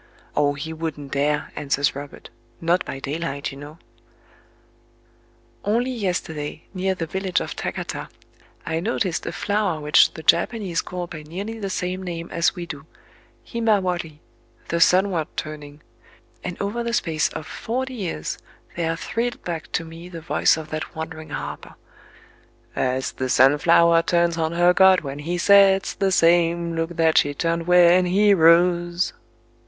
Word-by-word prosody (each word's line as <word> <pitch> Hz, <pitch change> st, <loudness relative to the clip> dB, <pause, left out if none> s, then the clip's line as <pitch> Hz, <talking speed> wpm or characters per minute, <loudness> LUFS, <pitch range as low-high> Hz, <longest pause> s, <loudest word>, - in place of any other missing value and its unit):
"Oh, 145 Hz, -1 st, +2 dB
he 160 Hz, +3 st, -5 dB
wouldn't 155 Hz, -3 st, -5 dB
dare," 145 Hz, +1 st, 0 dB
answers 140 Hz, -1 st, 0 dB
Robert—"not 145 Hz, +5 st, -4 dB
by -, -, -5 dB
daylight, 140 Hz, 0 st, -4 dB
you 135 Hz, -, -10 dB
know."... 145 Hz, +2 st, -10 dB, 1.9 s
[Only 235 Hz, +5 st, 0 dB
yesterday, 170 Hz, -9 st, -3 dB
near 190 Hz, 0 st, -1 dB
the 165 Hz, -, -3 dB
village 190 Hz, +2 st, -1 dB
of -, -, -5 dB
Takata, -, -, -5 dB, 0.6 s
I 160 Hz, 0 st, -1 dB
noticed 185 Hz, -2 st, -2 dB
a -, -, -2 dB
flower 200 Hz, -5 st, -1 dB
which 150 Hz, 0 st, +4 dB
the 160 Hz, -, -8 dB
Japanese 185 Hz, -1 st, +2 dB
call 180 Hz, -1 st, -5 dB
by 165 Hz, -2 st, -9 dB
nearly 195 Hz, +9 st, -6 dB
the 200 Hz, -2 st, -3 dB
same 185 Hz, 0 st, -3 dB
name 170 Hz, -2 st, -6 dB
as 170 Hz, -, +1 dB
we 175 Hz, -2 st, -5 dB
do: 155 Hz, -2 st, -9 dB, 0.6 s
Himawari, 185 Hz, -9 st, -1 dB, 0.5 s
"The 170 Hz, 0 st, 0 dB
Sunward 180 Hz, -3 st, +3 dB
turning;"—and 155 Hz, +3 st, -9 dB
over 205 Hz, +4 st, -2 dB
the 235 Hz, 0 st, -3 dB
space 160 Hz, -9 st, 0 dB
of 155 Hz, -, -6 dB
forty 260 Hz, +8 st, -4 dB
years 180 Hz, -, -4 dB, 0.4 s
there 165 Hz, -1 st, -1 dB
thrilled 235 Hz, +7 st, -3 dB
back 165 Hz, -3 st, -5 dB
to 165 Hz, -, -1 dB
me 165 Hz, +2 st, -10 dB
the 170 Hz, -2 st, -8 dB
voice 160 Hz, -, +2 dB
of 155 Hz, -1 st, -8 dB
that 155 Hz, 0 st, -5 dB
wandering 160 Hz, -1 st, -7 dB
harper,— -, -, -6 dB, 1.0 s
As 130 Hz, 0 st, -1 dB
the 130 Hz, 0 st, -4 dB
Sunflower 165 Hz, +6 st, +5 dB
turns 170 Hz, 0 st, +1 dB
on 160 Hz, 0 st, -1 dB
her 175 Hz, +1 st, +4 dB
god, 190 Hz, 0 st, +6 dB
when 140 Hz, -2 st, -6 dB
he 170 Hz, +4 st, -3 dB
sets, 195 Hz, +1 st, +5 dB
The 195 Hz, -1 st, 0 dB
same 170 Hz, -1 st, +3 dB
look 165 Hz, +1 st, -2 dB
that 160 Hz, -1 st, +4 dB
she 145 Hz, 0 st, 0 dB
turned 165 Hz, +2 st, -1 dB
when 180 Hz, 0 st, +6 dB
he 200 Hz, +3 st, +4 dB
rose. 175 Hz, 0 st, +3 dB
170 Hz, 150 wpm, -23 LUFS, 155-185 Hz, 1.9 s, god